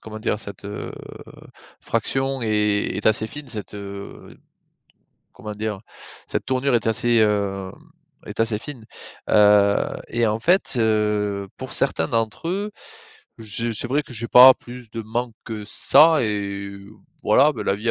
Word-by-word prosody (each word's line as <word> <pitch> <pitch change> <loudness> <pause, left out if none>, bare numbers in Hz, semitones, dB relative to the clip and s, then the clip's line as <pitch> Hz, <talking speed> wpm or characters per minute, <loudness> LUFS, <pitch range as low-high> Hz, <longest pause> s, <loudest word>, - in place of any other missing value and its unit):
comment 110 0 -9
dire? 105 - -1
Cette, 100 -1 -9
heu, 105 +1 -6 0.9
fraction 135 0 -1
est 105 -2 0
est 105 - -3
assez 110 0 +3
fine 145 +3 -9
cette, 105 -2 -7
heu, 100 0 -9 1.0
comment 105 -1 -8
dire? 105 -1 -4 0.5
Cette - - -3
tournure 130 0 0
est 115 - +1
assez, 115 +1 +2
heu, 100 -3 0 0.5
est - - -8
assez 115 -2 +1
fine. 120 -1 -9 0.5
Heu, 105 -1 +5 0.3
et 120 -1 +1
en 110 +1 0
fait, 175 +5 +2
heu, 105 -3 0
pour - - -8
certains 80 - +1
d'entre 115 +8 -2
eux, 200 +3 -2 0.7
je 115 +1 -2
c'est 110 - -2
vrai 145 +3 +1
que 140 - -13
j'ai 115 +1 -4
pas 130 +1 +10
plus 120 -2 -12
de 115 - -5
manque 115 +1 -3
que 110 -3 -6
ça 155 +4 +5
et 100 -2 -3 0.5
voilà, 150 +3 +4
bah, 120 - -6
la 100 - +1
vie 115 +2 -1
110 Hz, 155 wpm, -22 LUFS, 105-120 Hz, 1.0 s, pas